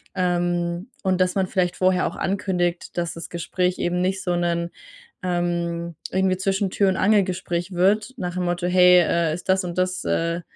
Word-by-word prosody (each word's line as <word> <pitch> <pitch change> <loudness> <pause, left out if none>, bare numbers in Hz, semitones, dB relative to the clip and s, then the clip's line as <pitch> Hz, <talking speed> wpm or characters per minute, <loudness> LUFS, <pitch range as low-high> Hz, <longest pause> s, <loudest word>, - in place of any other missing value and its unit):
Ähm, 175 +1 -1
und 190 -1 +1
dass 180 0 +2
man 190 -1 +1
vielleicht 180 -1 0
vorher 185 0 +2
auch - - -6
ankündigt, 180 -3 -1
dass 170 -1 -2
das 165 - -8
Gespräch 180 +1 -1
eben 175 +1 0
nicht 190 +1 -1
so 180 - 0
'nen, 170 -1 0 0.5
ähm 170 -1 -2 0.2
irgendwie 190 0 +1
Zwischen-Tür-und-Angel-Gespräch 190 -2 +1
wird, 210 +7 +2
nach 180 -1 -3
dem 180 -1 -1
Motto: 175 0 -1
„Hey, 180 0 +6
äh, 170 -1 +1
ist 180 - -11
das 190 0 +3
und 175 -1 -5
das 185 0 0
äh, 170 +1 0
180 Hz, 165 wpm, -23 LUFS, 175-185 Hz, 0.5 s, Hey